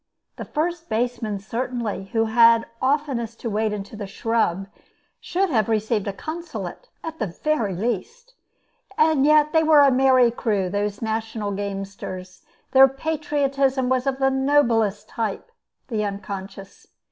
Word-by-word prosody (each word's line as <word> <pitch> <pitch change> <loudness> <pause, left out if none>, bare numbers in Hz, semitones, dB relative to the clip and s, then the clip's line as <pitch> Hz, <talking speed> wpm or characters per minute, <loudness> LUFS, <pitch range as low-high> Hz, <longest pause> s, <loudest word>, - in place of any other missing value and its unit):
The - - -6
first 335 +2 -3
baseman 230 -2 -1
certainly, 230 -1 -4
who 225 +3 0
had 230 0 +5 0.2
oftenest 260 -5 -1
to 230 - -3
wade 215 +1 0
into 205 +1 -6
the 205 -2 -6
scrub, 195 -3 0 0.5
should 375 0 -1
have 220 -4 +1
received 215 -1 0
a - - 0
consulate, 335 - -7
at 320 0 -6
the 215 - -1
very 215 - -1
least. 245 - -4 0.6
Yet 305 -1 +4
they 320 - +5
were 310 -2 +6
a 280 -1 +6
merry 255 -2 +4
crew, 205 -6 -1
those 205 +1 -2
national 220 -1 -2
gamesters. 195 -2 -6 0.3
Their 265 0 +8
patriotism 275 -2 0
was 260 +1 +1
of 270 -1 0
the 270 0 +2
noblest 245 -7 +2
type, 225 - -4 0.4
the 220 -4 -1
unconscious. 195 -1 -7
230 Hz, 135 wpm, -23 LUFS, 205-275 Hz, 0.6 s, Their